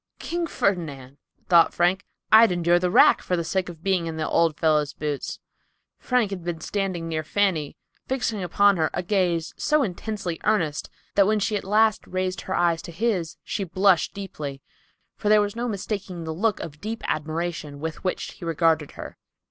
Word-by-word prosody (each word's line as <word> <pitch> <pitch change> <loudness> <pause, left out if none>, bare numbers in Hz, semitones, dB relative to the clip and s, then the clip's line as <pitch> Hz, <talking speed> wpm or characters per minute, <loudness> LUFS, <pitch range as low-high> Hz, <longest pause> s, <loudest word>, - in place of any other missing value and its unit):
"King 345 0 -3
Ferdinand!" 145 - -2 0.3
thought 170 -2 +5
Frank, 180 +3 +1 0.2
"I'd 220 -1 +8
endure 175 0 +3
the 180 0 0
rack - - +6
for 180 - -1
the 170 - -1
sake 185 +2 -1
of 165 -2 -11
being 185 -3 +1
in 160 -1 -5
the 155 - -1
old 165 -2 +2
fellow's 150 -2 +2
boots." 145 -2 -4 0.6
Frank 245 -5 +1
had 185 -3 -5
been 170 -1 -3
standing 185 -1 -3
near 160 -1 -2
Fanny, 165 -4 0 0.3
fixing 240 -5 -1
upon 200 +2 +3
her 160 -2 +1
a - - -2
gaze 175 -4 0
so 300 -1 +2
intensely 195 -3 -4
earnest 170 -8 0 0.2
that 200 -1 +4
when 215 0 +2
she 210 +1 0
at 205 - -2
last 215 +2 +2
raised 185 -2 -2
her - - -3
eyes 170 -1 +2
to - - -9
his 180 -3 -1
she 200 - -3
blushed 185 -1 +2
deeply, 150 -9 -6 0.5
for 210 - -1
there 215 0 +6
was 205 0 -1
no 240 +1 -2
mistaking 195 -4 -4
the 160 0 -4
look 210 +5 0
of 150 -2 -8
deep 220 +2 -5
admiration 155 -1 -3
with 160 +1 -5
which 185 - -2
he - - -14
regarded 160 -2 +1
her. - - -9
175 Hz, 185 wpm, -24 LUFS, 160-205 Hz, 0.6 s, I'd